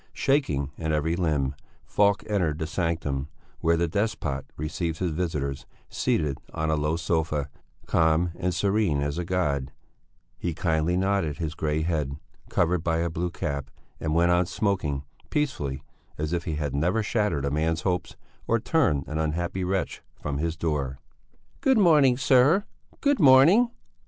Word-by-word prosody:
Shaking 75 - +1
in 80 -1 -1
every 80 +2 +1
limb, 75 -6 0 0.3
Falk 100 -1 +2
entered 90 -8 0
the 80 - -2
sanctum, 80 -5 -2 0.3
where 85 0 +2
the 85 +1 +1
despot 80 -8 -2
received 80 +2 -3
his 90 -1 -1
visitors, 75 -5 -3 0.2
seated 75 -3 0 0.2
on 80 -1 0
a - - +3
low 75 +1 0
sofa, 80 -4 -1 0.3
calm 80 +2 +2
and 90 0 -1
serene 100 -5 +1
as 75 +3 -2
a - - -1
god; 75 -7 -1 0.7
he 85 -2 -2
kindly 80 +1 +1
nodded 95 -6 0
his 80 -1 -3
grey 80 0 -1
head, 75 -5 -1 0.3
covered 85 -1 +1
by 80 -1 +1
a 85 0 -1
blue 85 +2 -2
cap, 70 -4 -4 0.3
and 80 -1 -1
went 85 +1 +4
on 90 0 +3
smoking, 85 -10 -1 0.3
peacefully, 95 - -2 0.3
as 75 +2 -2
if 85 -1 -1
he 80 - -2
had 75 -3 -2
never 90 +10 +1
shattered 105 - 0
a 70 - -1
man's 80 +2 0
hopes 90 0 -2 0.3
or 115 - +3
turned 110 - +1
an 75 +1 -3
unhappy 85 +4 -1
wretch 95 +1 -2 0.2
from 70 -1 -3
his 80 +1 -2
door. 75 -5 -1 0.6
"Good 265 -2 +3
morning, 150 - +5
sir, 135 +8 +4 0.4
good 285 -2 +2
morning!" 160 - +7
85 Hz, 155 wpm, -26 LUFS, 75-95 Hz, 0.7 s, morning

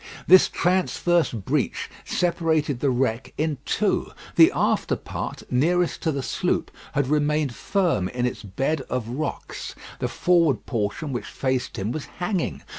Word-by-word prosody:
This 185 +1 +7
transverse 175 -1 +2
breach 110 -6 -1 0.2
separated 160 -6 0
the 140 - +2
wreck 125 -2 0
in 155 -3 -1
two. - - +1 0.3
The - - +8
after - - +1
part, - - -6
nearest 170 +7 +2
to 160 - +1
the 140 -2 -3
sloop, - - -1 0.2
had 140 - +2
remained 150 -1 +1
firm 170 - 0
in 125 +2 -1
its 125 - -2
bed 135 +9 -1
of 125 -3 -2
rocks. 130 +6 -4 0.2
The - - 0
forward 170 -7 +2
portion 115 +5 -2
which 120 - -4
faced 130 -2 -2
him 100 +4 -2
was 150 +2 -4
hanging. 180 -1 -2
145 Hz, 145 wpm, -24 LUFS, 125-165 Hz, 0.3 s, The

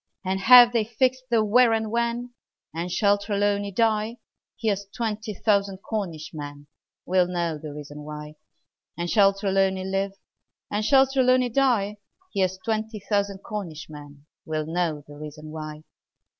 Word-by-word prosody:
And 190 +1 0
have 240 +3 +8
they 230 -2 +2
fixed 255 +4 0
the 225 -2 +3
where 235 +2 +5
and 220 -1 -1
when? 235 +1 -1 0.4
And 170 +2 -4
shall 205 +1 +3
Trelawny 200 0 0
die? 220 +2 +1 0.4
Here's 200 -3 -1
twenty 220 0 -4
thousand 200 -2 0
Cornish 175 -7 -4
men 145 -1 -8 0.4
Will 180 0 +3
know 170 -3 -2
the 155 -1 -7
reason 145 0 -9
why! 150 0 -8 0.6
And 175 0 -2
shall 200 -3 +6
Trelawny 195 -1 0
live? 195 +1 -1 0.6
Or 205 - 0
shall 265 +5 +5
Trelawny 255 -2 +3
die? 230 -5 +1 0.4
Here's 190 -1 0
twenty 220 -1 -2
thousand 200 -1 -1
Cornish 165 -8 -6
men 145 -1 -12 0.2
Will 155 -1 -3
know 160 -2 -1
the 145 0 -12
reason 155 0 -9
why! 155 -1 -7
200 Hz, 145 wpm, -25 LUFS, 160-220 Hz, 0.6 s, have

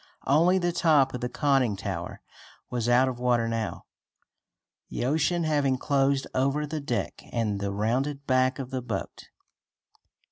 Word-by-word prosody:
Only 170 +6 +4
the 175 -1 0
top 150 -6 +3
of 125 - -5
the 125 - -2
conning 135 -6 +2
tower 95 -3 -5 0.5
was 120 -1 -1
out 125 +2 +5
of 125 -2 -4
water 120 -2 +2
now, 115 -6 -3 1.0
the - - -3
ocean 160 +5 +1
having 145 -4 +1
closed 135 0 +1
over 140 +3 +1
the 155 +1 -4
deck 125 -4 -3
and 110 -4 -1
the 100 0 -2
rounded 130 +8 -1
back 130 0 +2
of 130 -1 -6
the 130 -1 -2
boat. 110 -5 -5
130 Hz, 150 wpm, -27 LUFS, 120-145 Hz, 1.0 s, out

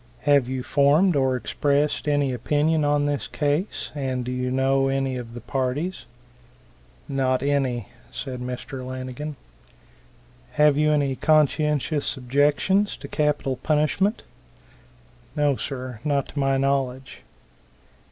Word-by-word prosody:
"Have 140 -4 +3
you 130 -1 -3
formed 150 +7 +3
or 130 -2 +2
expressed 145 +5 0
any 145 -3 +1
opinion 150 +5 +1
on 145 0 +2
this 145 -1 -1
case, 150 +7 -2
and 130 -4 -2
do 125 - -3
you 125 0 -2
know 135 +1 +2
any 135 -1 0
of 120 -2 -7
the 120 - -7
parties?" 135 +8 -2 1.0
"Not 130 -1 0
any," 135 -6 0 0.2
said 130 -3 -5
Mr. 125 +1 -6
Lanigan. 130 +3 -6 1.2
"Have 150 -1 +4
you 150 +1 +3
any 140 -3 +1
conscientious 150 0 +1
objections 145 +10 +2
to - - -9
capital 145 -3 0
punishment?" 155 - +1 1.1
"No, 145 -2 +2
sir, 130 -4 -6
not 140 -2 0
to 145 - -5
my 135 -1 +2
knowledge." 135 -1 -1
140 Hz, 125 wpm, -24 LUFS, 130-150 Hz, 1.2 s, Have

